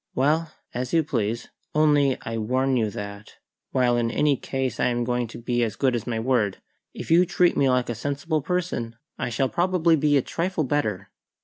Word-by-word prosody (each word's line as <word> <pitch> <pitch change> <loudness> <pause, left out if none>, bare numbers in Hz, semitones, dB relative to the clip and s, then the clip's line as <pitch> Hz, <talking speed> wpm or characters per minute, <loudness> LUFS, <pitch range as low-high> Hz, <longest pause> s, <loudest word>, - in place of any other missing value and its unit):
Well, 155 +5 +1 0.2
as 125 0 -3
you 165 -1 +4
please; 115 -4 -2 0.3
only 145 -3 +4
I 115 0 -3
warn 130 +4 +1
you 110 -3 +1
that, 100 +1 -8 0.3
while 125 -2 +2
in 115 -1 +1
any 145 +4 +2
case 130 -2 -3
I - - +3
am 120 -1 0
going 120 0 -1
to 110 - -10
be 120 +1 -1
as 110 -2 -2
good 130 -1 +1
as 115 - -4
my 115 -2 -1
word, 110 -5 +1 0.3
if - - -7
you 170 +2 +7
treat 180 0 +2
me 135 - +3
like 125 -1 +2
a 120 - -2
sensible 145 +6 -2
person 165 -8 -2 0.2
I - - -1
shall 125 +3 0
probably 175 0 +2
be 150 -1 +3
a 135 - +1
trifle 170 -1 -1
better." 110 -9 -1
130 Hz, 200 wpm, -25 LUFS, 115-150 Hz, 0.3 s, you